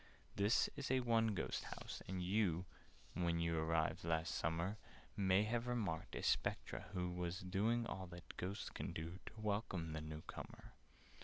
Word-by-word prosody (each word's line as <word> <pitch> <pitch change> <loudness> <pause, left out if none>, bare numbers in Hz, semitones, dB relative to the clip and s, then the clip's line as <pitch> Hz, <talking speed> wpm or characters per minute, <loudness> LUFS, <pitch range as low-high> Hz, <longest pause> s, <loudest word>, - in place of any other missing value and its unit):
"This 100 +4 +4
is 140 - -3
a 130 0 +4
'one 115 -3 +3
ghost' - - -1
house, - - -6
and 95 -1 -2
you 90 -2 +2 0.5
When 85 -1 +2
you 85 0 +2
arrived 80 0 +2
last 80 0 +1
summer, 85 +6 0 0.4
May 95 0 +5
have 115 +2 0
remarked 105 -10 -1
a - - -3
Spectre - - +1
who 90 -1 0
Was 90 +1 -2
doing 110 +6 +2
all 95 -4 -4
that 85 0 -9
Ghosts 95 +3 -3
can - - -3
do 85 +3 -4
To 110 - -8
welcome 100 -6 0
the 80 - -2
new 80 0 -5
comer. - - -8
95 Hz, 165 wpm, -41 LUFS, 85-110 Hz, 0.5 s, May